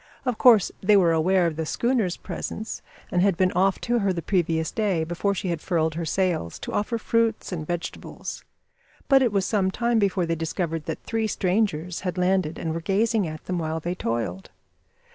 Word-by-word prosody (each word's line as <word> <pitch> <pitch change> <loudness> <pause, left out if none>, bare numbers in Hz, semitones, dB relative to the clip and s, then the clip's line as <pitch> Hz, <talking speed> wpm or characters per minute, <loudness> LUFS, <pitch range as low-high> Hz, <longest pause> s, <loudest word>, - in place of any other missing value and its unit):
Of 250 -3 -1
course 230 -6 +6
they 205 +2 +5
were 175 -4 +4
aware 175 +3 +3
of 160 -2 -1
the 160 - -2
schooner's 235 -6 0
presence, 220 +1 -5 0.3
and 175 - +2
had 195 -2 +3
been 185 0 +3
off 190 +1 +2
to 240 0 +1
her 200 -2 +1
the 170 -2 -3
previous 165 -3 0
day, 200 -7 0
before 175 +5 -1
she 185 - -3
had 170 -3 -2
furled 160 -3 0
her 165 +1 -3
sails, 170 - -1
to - - -5
offer 220 +3 0
fruits 230 -1 0
and 155 -4 -4
vegetables; 175 -1 -5 0.6
but 270 -1 +6
it 245 -4 +3
was 195 -2 +1
some 195 -4 +1
time 235 +3 +1
before 195 -3 +1
they 165 - -1
discovered 165 -1 -2
that - - -4
three 225 -1 -1
strangers 180 -4 0
had 180 -1 -4
landed 180 -3 +1
and 160 -1 -3
were 165 - -3
gazing 205 +2 +1
at 155 0 -8
them 180 -1 -2
while 160 0 -2
they 175 +3 -3
toiled. 115 - -3
185 Hz, 200 wpm, -25 LUFS, 165-205 Hz, 0.6 s, course